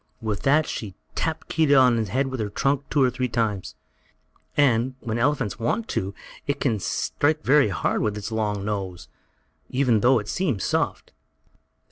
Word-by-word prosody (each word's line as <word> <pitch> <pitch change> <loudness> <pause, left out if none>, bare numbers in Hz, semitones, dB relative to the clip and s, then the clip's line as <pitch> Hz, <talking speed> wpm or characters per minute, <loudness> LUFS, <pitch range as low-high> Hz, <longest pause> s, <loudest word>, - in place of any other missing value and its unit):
With 110 -4 -3
that 150 +3 +3
she 100 -5 -5 0.2
tapped 160 -1 -2
Keedah 155 -3 +3
on 125 -2 +5
his 110 -3 -1
head 130 +7 +1
with 130 -1 -4
her 105 -2 -2
trunk 140 +6 0
two 145 -3 +3
or 125 - +3
three 130 +1 -1
times, 110 -5 -2 0.8
and, 130 -2 +3
when 115 -1 -3
an - - 0
elephant 130 -6 0
wants 215 - -1
to, 95 +1 -2 0.3
it 140 - -1
can 115 -6 0
strike 150 - 0
very 140 -4 +4
hard 90 - 0
with 105 -1 -1
its 105 +2 -5
long 105 -3 -1
nose, 95 -4 -4 0.6
even 125 -4 +2
though 125 +4 +4
it 105 -2 -3
seems 135 - -1
soft. - - -1
120 Hz, 175 wpm, -24 LUFS, 105-140 Hz, 0.8 s, on